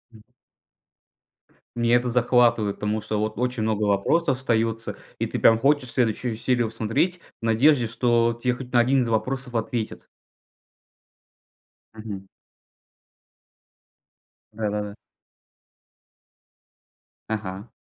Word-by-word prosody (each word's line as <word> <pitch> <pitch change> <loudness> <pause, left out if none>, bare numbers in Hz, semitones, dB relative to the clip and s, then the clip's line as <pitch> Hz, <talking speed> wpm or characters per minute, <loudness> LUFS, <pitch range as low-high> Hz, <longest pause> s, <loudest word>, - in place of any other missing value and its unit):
М. 110 - -16 1.5
Меня 120 0 +3
это 120 0 +1
захватывает, 120 -3 +3
потому 105 +1 -2
что 105 0 -3
вот 110 +1 -2
очень 125 -1 -1
много 110 -1 0
вопросов 125 +9 +2
остается 115 -3 -1 0.2
и - - 0
ты - - -4
там 115 - +6
хочешь 135 +1 +2
следующую 120 -1 0
серию 120 0 0
смотреть 120 - -1 0.2
в - - -4
надежде 120 +3 +4
что 115 0 +1
тебе 125 0 +1
хоть 125 -1 -10
на 120 - +5
1 130 +2 +3
из 120 - -3
вопросов 125 +3 -2
ответят. 115 0 -3 1.9
Мгм. 105 -3 -8 2.3
Да-да-да. 105 -1 -3 2.4
Ага. 100 -1 -4
115 Hz, 105 wpm, -24 LUFS, 110-125 Hz, 2.4 s, там